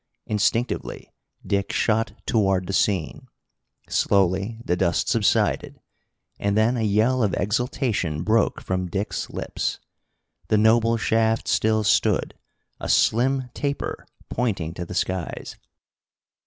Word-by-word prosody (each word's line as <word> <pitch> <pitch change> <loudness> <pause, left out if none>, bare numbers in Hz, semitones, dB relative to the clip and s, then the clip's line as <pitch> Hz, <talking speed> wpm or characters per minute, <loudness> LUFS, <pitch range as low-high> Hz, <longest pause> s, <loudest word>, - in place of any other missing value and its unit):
Instinctively 110 +3 -1 0.3
Dick 100 -1 -1
shot 110 0 +1
toward 95 -4 +1
the 95 - -4
scene. 95 -6 0 0.6
Slowly 100 +3 +1
the 90 - +1
dust 85 -2 0
subsided, - - +1 0.6
and 100 +1 0
then 110 +3 +3
a 120 - -1
yell 110 +5 +2
of 105 -5 +1
exultation 105 - -1
broke 110 +2 +1
from 90 -1 -2
Dick's 100 +4 -3
lips. - - -3 0.7
The 110 - +3
noble 115 +2 +4
shaft 110 0 +1
still 110 0 +2
stood, 100 - +2 0.5
a - - -5
slim 130 +2 +2
taper 140 -1 -3 0.2
pointing 95 -10 -1
to 90 - -5
the 90 - -8
skies. 95 -1 -3
105 Hz, 115 wpm, -24 LUFS, 95-115 Hz, 0.7 s, noble